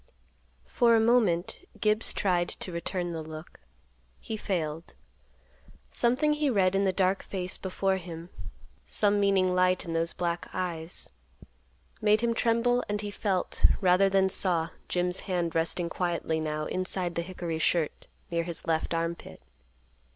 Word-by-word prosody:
For 235 -2 +3
a - - +5
moment 220 -7 +2 0.2
Gibbs 215 +1 +3
tried 175 -3 +1
to 185 - -4
return 175 +1 -3
the 165 -1 -4
look. 155 +1 -10 0.6
He 220 - -5
failed. 165 -6 -3 1.0
Something 255 +6 +2
he 300 -1 +1
read 195 -6 +3
in 195 +1 +2
the 190 - +3
dark 190 +1 +1
face 185 -2 -1
before 190 0 -1
him—some 180 +4 -3
meaning 195 -2 +3
light 185 0 +2
in 165 - -4
those 165 0 0
black 170 -1 -2
eyes—made 185 +4 -4
him 235 -1 +1
tremble 235 +2 +2
and 210 0 -1
he 205 -1 -5
felt, 195 -3 -2 0.2
rather 185 0 +4
than 190 0 +3
saw, 170 -3 +1 0.2
Jim's 180 0 0
hand 175 -3 0
resting 165 +1 0
quietly 170 -2 -1
now 155 -1 -2
inside 185 -1 -2
the 170 - -1
hickory 170 -2 -4
shirt 160 -1 0 0.2
near 170 0 +1
his 170 -1 -6
left 165 0 0
arm 165 0 0
pit. - - -13
180 Hz, 145 wpm, -28 LUFS, 170-200 Hz, 1.0 s, a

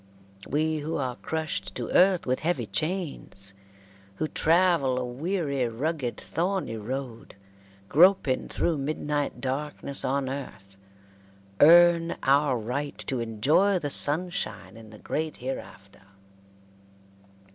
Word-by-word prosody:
We 155 +2 0
who 155 +2 -4
are 130 -4 -2
crushed 160 0 -4
to - - -4
earth 185 -1 +4
with 130 0 0
heavy 175 +2 -1
chains, 155 - -4 0.6
who 155 - -2
travel 165 -6 +2
a 125 - -1
weary, 140 0 -2
rugged, 130 +2 -3
thorny 175 -8 -2
road, 120 +2 -6 0.5
groping 165 - +4
through 165 -4 -1
midnight 145 0 -2
darkness 140 +1 -2
on 135 +1 0
earth, 100 -8 -7 0.8
earn 170 +1 +6
our 140 -1 +3
right 125 +6 -4
to 130 - -2
enjoy 135 - +2
the 145 -5 -3
sunshine 150 - 0
in 115 -1 -13
the 105 - -12
great 155 +7 -3
hereafter. 100 -7 -8
145 Hz, 115 wpm, -26 LUFS, 125-165 Hz, 0.8 s, earn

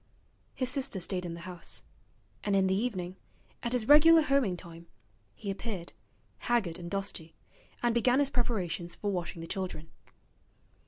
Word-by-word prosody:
His 255 - 0
sister 265 -7 -1
stayed 180 0 -2
in 170 - -5
the 170 - -9
house, 180 -1 -7 0.6
and 205 -1 +1
in 195 -1 +4
the 190 - +2
evening, 190 -4 -2 0.4
at 235 0 -1
his 235 -3 0
regular 320 +2 +8
homing 275 -11 +2
time, 170 0 -11 0.5
he 200 - -4
appeared, 195 -4 -5 0.5
haggard 200 -9 0
and 170 -1 -6
dusty, 195 -4 -3 0.5
and 240 -1 +3
began 245 +2 +4
his 280 -1 +2
preparations 180 -8 -1
for 205 - -2
washing 175 -2 -3
the 165 - -6
children. 170 -4 -4
195 Hz, 155 wpm, -31 LUFS, 175-240 Hz, 0.6 s, regular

